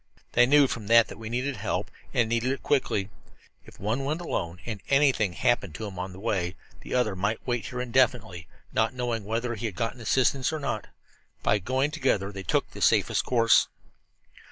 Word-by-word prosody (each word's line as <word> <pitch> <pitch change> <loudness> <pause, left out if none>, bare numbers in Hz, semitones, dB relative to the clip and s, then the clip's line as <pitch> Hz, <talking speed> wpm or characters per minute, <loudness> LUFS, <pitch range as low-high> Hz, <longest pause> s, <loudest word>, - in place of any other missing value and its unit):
They 120 0 +5
knew 145 +1 +6
from 115 -5 -4
that 115 0 +6
that - - -10
we 110 -1 -6
needed 125 +2 -2
help, 100 0 -3 0.2
and 120 -2 +2
needed 115 +3 0
it 135 - -8
quickly. 105 -8 0 0.6
If - - -15
one 110 +7 -1
went 150 +4 -1
alone, 85 - -3
and 110 -4 -5
anything 135 -9 +3
happened 100 -6 0
to 110 - -5
him 95 -3 -7
on 95 +1 -4
the 95 - -11
way, 95 -4 -1 0.2
the - - -5
other 115 -6 +1
might 105 +4 -2
wait 120 -3 -2
here 125 0 -5
indefinitely, 120 -8 +1 0.3
not 115 +3 +1
knowing 120 -4 -2
whether 115 +3 -2
he 115 +1 -3
had 100 - -7
got 115 +6 -2
assistance 130 +3 +1
or 155 - -3
not. 120 -7 -3 0.6
By 100 +1 +3
going 130 +8 0
together 100 -10 0
they 95 -1 -7
took - - 0
the - - -10
safest - - +3
course." 115 -2 +4
115 Hz, 195 wpm, -27 LUFS, 100-130 Hz, 0.6 s, knew